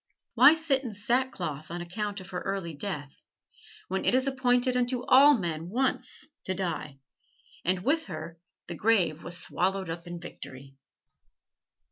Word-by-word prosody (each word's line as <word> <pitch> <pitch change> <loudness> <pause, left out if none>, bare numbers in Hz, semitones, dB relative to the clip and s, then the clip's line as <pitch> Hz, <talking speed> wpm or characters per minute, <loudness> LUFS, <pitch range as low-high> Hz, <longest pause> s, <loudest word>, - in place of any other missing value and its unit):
Why 305 - +8
sit 310 -5 +1
in 235 -4 -5
sackcloth 205 - -1
on 175 +1 -4
account 200 +4 -4
of 185 0 -11
her 180 - -3
early 195 -4 -3
death, 145 -3 -5 0.7
when 190 +1 -2
it - - +3
is 260 +1 +2
appointed 255 -2 +2
unto 250 0 +1
all 280 +2 +7
men 165 -3 -3
once 260 +6 -1 0.2
to 185 - -1
die, 170 -6 -3 0.7
and 185 0 0
with 315 +6 +1
her 165 -2 -7 0.3
the - - -5
grave 180 -4 +2
was 175 0 -3
swallowed 185 +1 -1
up 170 +1 -7
in 175 0 -6
victory? 135 -5 -10
190 Hz, 150 wpm, -28 LUFS, 170-250 Hz, 0.7 s, Why